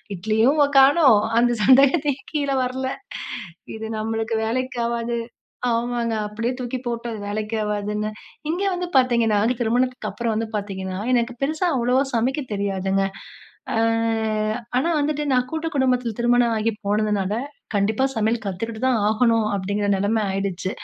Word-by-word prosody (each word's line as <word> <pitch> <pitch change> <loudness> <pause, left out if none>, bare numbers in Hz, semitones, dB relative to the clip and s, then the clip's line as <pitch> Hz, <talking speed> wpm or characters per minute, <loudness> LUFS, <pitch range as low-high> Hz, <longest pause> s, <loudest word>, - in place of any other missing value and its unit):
இட்லியும் 220 - +2
வொ 285 - +7
காணோம். 270 -4 +6 0.2
அந்த 240 0 +3
சந்தேகத்தையும் 275 +1 +4
கீழ 285 -2 0
வரல. 260 +1 -2 0.9
இது 220 0 -6
நம்மளுக்கு 225 +1 -2
வேலைக்கு 255 +2 -2
ஆவாது. 235 0 -2 0.5
ஆமாங்க. 235 0 -1
அப்பிடியே 230 +4 -2
தூக்கி 250 0 -3
போட்டேன். 235 0 -3
அது 215 - -7
வேலைக்கு 215 +2 -3
ஆவாதுன்னு. 210 0 -2 0.4
இங்க 355 +4 -1
வந்து 360 0 -3
பார்த்தீங்கன்னா, 235 -4 +3 0.2
திருமணத்துக்கு 250 +2 0
அப்பறம் 235 -2 -2
வந்து 225 0 -2
பார்த்தீங்கன்னா. 190 -2 -4 0.2
எனக்கு 240 0 +2
பெருசா 310 +5 0
அவ்வளவா 250 +2 +2
சமைக்க 255 +6 +1
தெரியாதுங்க. 195 -1 0 0.7
அ - - 0 1.0
ஆனா 265 +6 +2
வந்துட்டு 295 0 -1
நான் 250 -1 +2
கூட்டு 320 0 -3
குடும்பத்தில 250 -3 +1
திருமணம் 240 -1 +3
ஆகி 220 +1 +1 0.2
போனதுனால, 205 -1 +1 0.4
கண்டிப்பா 210 +5 +1
சமையல் 225 +1 0
கத்துக்கிட்டு 220 +4 -4
தான் 255 -3 +3
ஆகணும், 225 0 +2
அப்பிடிங்கிற 200 +1 -1
நிலம 210 +3 +1
ஆயீடுச்சு. 190 -1 -2
230 Hz, 135 wpm, -22 LUFS, 210-255 Hz, 1.0 s, வொ